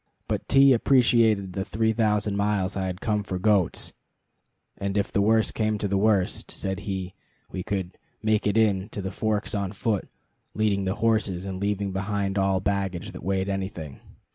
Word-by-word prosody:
But - - -2
T 135 0 +6
appreciated 115 -6 +3
the 95 - -2
three 110 +3 0
thousand 105 -2 +1
miles 100 -1 0
I 95 -1 -1
had 90 0 -5
come 105 -2 0
for 95 -2 -4
goats; 95 -2 +1 0.9
and 100 +1 -2
if 100 - 0
the 100 - +2
worst 110 +2 +3
came 110 -1 0
to 105 - -2
the 100 - 0
worst, 100 -2 +1
said 95 -1 -3
he, 95 -1 -3 0.4
we 95 - -4
could 95 -1 -4 0.2
"make 110 -1 +2
it 105 - +1
in" 105 -2 +2
to 100 - -3
the 95 - -3
Forks 110 +1 -1
on 100 -1 -2
foot, 105 0 -1 0.5
leading 105 -2 +1
the 95 +1 -1
horses, 105 -4 0
and 95 -1 -4
leaving 100 -1 -1
behind 100 0 -1
all 95 -1 +2
baggage 95 -3 -2
that - - -9
weighed 95 +1 0
anything. 95 -7 -4
100 Hz, 180 wpm, -26 LUFS, 95-110 Hz, 0.9 s, T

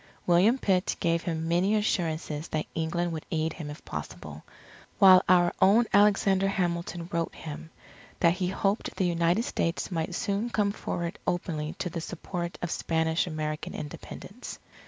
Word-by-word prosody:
William 185 +8 +4
Pitt 190 -6 +1
gave 170 -1 +1
him 165 -2 -3
many 180 +5 +2
assurances 165 -7 -1
that 155 -1 -2
England 170 +2 -1
would 160 -2 -6
aid 160 0 -1
him 155 -4 -7
if 150 - -10
possible; - - -7 0.5
while 190 -3 +8
our 175 -1 +5
own 205 +5 +6
Alexander 195 -1 +4
Hamilton 175 -2 -2
wrote 170 -2 -2
him, 160 0 -8 0.5
that 170 -1 +5
he 180 0 -2
hoped 195 +3 -1
the 190 - +1
United 170 +4 +2
States 170 -4 -2
might 170 +1 -2
soon 200 +6 -1
come 205 -3 +1
forward 175 -2 -4
openly 160 -3 -2
to - - -2
the 165 - -4
support 175 0 -5
of 175 - -2
Spanish 160 +1 0
American 155 -2 -4
Independence. 145 - -8
175 Hz, 155 wpm, -28 LUFS, 160-190 Hz, 0.5 s, while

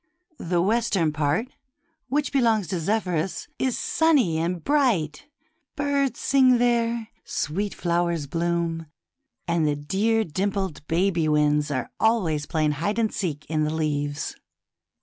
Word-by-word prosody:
The 175 0 0
western 200 -7 +1
part, 155 - 0 0.6
which 290 +1 -1
belongs 225 -8 +2
to 185 -3 -1
Zephyrus, 180 -2 -1
is 260 -2 0
sunny 270 - +2
and 170 +1 -2
bright; 245 - +1 0.5
birds 280 -4 0
sings 260 -2 +4
there, 235 -2 +1
sweet 195 +7 -2
flowers 170 -3 0
bloom, 165 +1 -1 0.6
and 170 -2 +1
the 145 - +1
dear 205 +10 +1
dimpled 190 0 -2
baby 170 -1 +1
winds 150 0 +2
are 130 -3 -3
always 170 -10 +1
playing 155 -2 +1
hide 170 +9 -2
and 225 -2 +1
seek 155 -6 -3
in 155 -1 0
the 155 +1 -1
leaves. 145 -2 -2
175 Hz, 130 wpm, -25 LUFS, 155-225 Hz, 0.6 s, sings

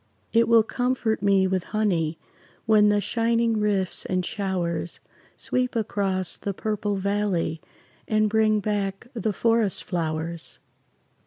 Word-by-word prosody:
It 230 0 +4
will 230 -1 +6
comfort 245 -2 -1
me 195 -1 +4
with 185 -1 0
honey 170 -7 +1 0.5
When 215 -2 +5
the 205 0 +3
shining 230 +1 +1
rifts 200 -3 0
and 185 -1 -1
showers 175 -5 -2 0.4
Sweep 250 -1 -1
across 195 -4 -1
the 200 -2 -4
purple 210 -1 -2
valley 195 -5 -1 0.5
And 215 0 +2
bring 215 0 +2
back 200 +1 -2
the 225 -2 -1
forest 225 0 +1
flowers. 165 -1 -3
205 Hz, 125 wpm, -25 LUFS, 185-220 Hz, 0.5 s, will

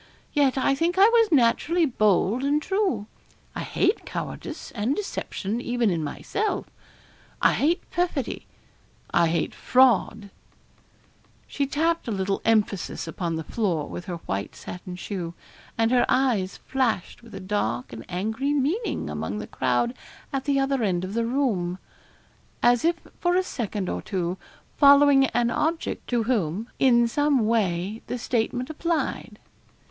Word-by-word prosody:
Yet 280 -3 +3
I 265 +1 +3
think 335 +5 0
I 395 +2 +8
was 460 -3 +4
naturally 300 +6 +3
bold 215 - +2
and 285 +2 +2
true. 375 - 0 0.5
I - - -3
hate 390 +4 0
cowardice - - -6
and 230 +5 -1
deception 235 - -3
even 240 -4 +1
in 165 -3 -1
myself 400 - -2 0.7
I - - +4
hate 330 +5 +1
perfidy 345 -8 -2 0.7
I 170 -1 +4
hate 170 +1 -1
fraud.' 225 -5 +3 1.1
She 280 -1 -2
tapped 325 +3 0
a - - -1
little 195 -1 -1
emphasis 210 -6 +1
upon 165 0 -3
the 160 - -3
floor 170 -5 -1
with 175 - -7
her 180 -3 -4
white 100 +1 -3
satin 180 0 -8
shoe, 180 -3 -5 0.4
and 225 +1 +2
her 250 -1 +3
eyes 235 -8 +1
flashed 245 -8 -1
with 230 -3 -13
a - - -5
dark 125 - -2
and 115 0 -7
angry 220 +10 -1
meaning 345 - -1
among 75 +7 -4
the - - -5
crowd 130 - 0 0.4
at 270 -1 -2
the 280 -2 +2
other 270 -1 +1
end 185 -5 0
of 190 - -6
the 230 0 0
room, 215 -10 0 0.9
as 245 -1 +4
if 335 +1 +3 0.2
for 350 0 +2
a 370 - +3
second 210 - -3
or - - -3
two 185 -2 -3 0.4
following 280 -1 +7
an 240 -1 +1
object 325 +5 -2
to 240 -2 +1
whom 215 -3 -1
in 240 -3 +5
some 285 -1 +2
way 210 -2 0
the 250 - -3
statement 245 +1 -1
applied. 330 +1 -2
235 Hz, 150 wpm, -25 LUFS, 190-280 Hz, 1.1 s, I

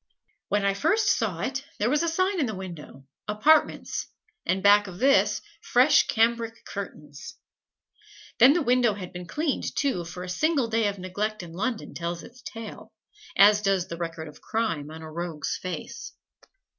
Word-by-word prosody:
When 205 -1 +1
I 200 - +3
first 400 - +2
saw 195 -8 -2
it, 265 +5 -2
there 215 +4 +1
was 295 - +2
a 335 - +1
sign 370 +3 0
in 280 - +1
the 220 - -4
window, 170 -7 -9 0.2
"Apartments," 285 +10 +2 0.4
and 190 +1 0
back 205 0 +6
of 180 -2 -9
this 275 +6 +3 0.2
fresh 260 +5 +4
cambric 230 0 0
curtains. 165 - -8 1.0
Then 255 +4 +8
the 340 -1 +1
window 245 -4 +3
had 185 -3 -8
been 180 0 -7
cleaned, 300 - -2
too, 265 -12 0
for 180 +2 -7
a - - -7
single 275 - +1
day 225 -1 +1
of 200 0 -3
neglect 200 +3 -3
in 165 -1 -10
London 220 +5 -3
tells 170 0 -4
its 250 +1 -14
tale, 225 -2 -9 0.5
as 205 +1 +7
does 195 -3 +1
the 170 - -5
record 165 -2 -5
of 150 - -13
crime 190 -10 -2
on 160 +1 -9
a 160 - -8
rogue's 165 -2 -3
face. 185 -1 -6
205 Hz, 170 wpm, -26 LUFS, 175-250 Hz, 1.0 s, Then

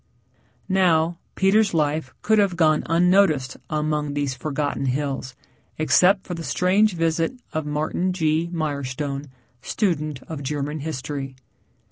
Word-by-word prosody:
Now, 175 -3 +2 0.2
Peter's 195 0 +3
life 150 -3 0
could 220 0 +4
have 200 -3 +2
gone 155 -2 +3
on 165 +2 +2
unnoticed 170 -8 +3
among 150 -1 -1
these 145 -2 -1
forgotten 140 +1 -2
hills, 135 -1 -2 0.4
except 180 +6 +4
for 180 - -5
the 165 -1 -5
strange 190 +4 +2
visit 165 +8 0
of 155 -1 -2
Martin 155 +5 -1
G. 160 -1 0
Mirestone, 140 -3 -3 0.3
student 155 - -1
of 160 -3 -7
German 145 +2 -3
history. 140 -2 -5
155 Hz, 125 wpm, -23 LUFS, 145-175 Hz, 0.4 s, could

